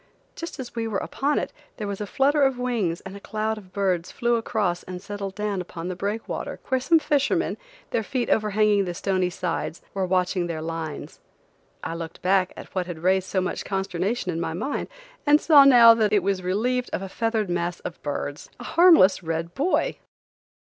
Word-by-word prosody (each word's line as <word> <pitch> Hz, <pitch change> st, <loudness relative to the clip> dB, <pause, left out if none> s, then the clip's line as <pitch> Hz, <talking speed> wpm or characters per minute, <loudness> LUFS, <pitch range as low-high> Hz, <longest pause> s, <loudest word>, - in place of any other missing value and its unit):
Just 335 Hz, -3 st, -7 dB
as 250 Hz, -2 st, -6 dB
we 230 Hz, -1 st, -2 dB
were 210 Hz, -3 st, -1 dB
upon 285 Hz, +8 st, -1 dB
it, -, -, -2 dB, 0.2 s
there 215 Hz, -, -4 dB
was 200 Hz, 0 st, -4 dB
a 205 Hz, -, -3 dB
flutter 285 Hz, +6 st, +2 dB
of 270 Hz, -2 st, +3 dB
wings 230 Hz, -9 st, -1 dB
and 190 Hz, +1 st, -9 dB
a -, -, -8 dB
cloud 215 Hz, +1 st, -2 dB
of 185 Hz, -3 st, -17 dB
birds 185 Hz, -3 st, -1 dB
flew 240 Hz, 0 st, 0 dB
across 210 Hz, -6 st, -1 dB
and 180 Hz, -1 st, -7 dB
settled 200 Hz, 0 st, -6 dB
down 210 Hz, -3 st, -2 dB
upon 175 Hz, -1 st, -6 dB
the 185 Hz, -, -3 dB
breakwater, 205 Hz, +4 st, -4 dB
where 260 Hz, 0 st, +2 dB
some 325 Hz, +6 st, +4 dB
fishermen, 290 Hz, -2 st, +1 dB, 0.4 s
their 225 Hz, -, +1 dB
feet 245 Hz, +3 st, -2 dB
overhanging 210 Hz, -1 st, +2 dB
the 175 Hz, -1 st, -4 dB
stony 185 Hz, 0 st, 0 dB
sides, 175 Hz, -2 st, -3 dB
were 190 Hz, -2 st, -1 dB
watching 180 Hz, -1 st, +1 dB
their 165 Hz, -2 st, -3 dB
lines. 160 Hz, -2 st, -5 dB, 0.6 s
I -, -, -3 dB
looked 165 Hz, -1 st, -7 dB
back 185 Hz, 0 st, +3 dB
at -, -, -11 dB
what 185 Hz, -2 st, -1 dB
had 170 Hz, -2 st, -7 dB
raised 190 Hz, 0 st, +2 dB
so 190 Hz, -, 0 dB
much 185 Hz, -, -3 dB
consternation 195 Hz, +1 st, -2 dB
in 165 Hz, 0 st, -3 dB
my 160 Hz, -, -2 dB
mind, 270 Hz, -, -3 dB, 0.4 s
and 295 Hz, +1 st, +6 dB
saw 295 Hz, -4 st, +7 dB
now 240 Hz, -4 st, +9 dB
that 220 Hz, -2 st, +1 dB
it 205 Hz, -4 st, +3 dB
was 195 Hz, -1 st, 0 dB
relieved 240 Hz, +7 st, 0 dB
of -, -, -2 dB
a -, -, -4 dB
feathered 225 Hz, +1 st, -1 dB
mass 175 Hz, 0 st, -1 dB
off 165 Hz, -, -6 dB
birds,–a 145 Hz, +9 st, -5 dB
harmless 320 Hz, -, +6 dB
red 165 Hz, 0 st, -3 dB
buoy! 315 Hz, -, 0 dB
195 Hz, 195 wpm, -25 LUFS, 180-235 Hz, 0.6 s, now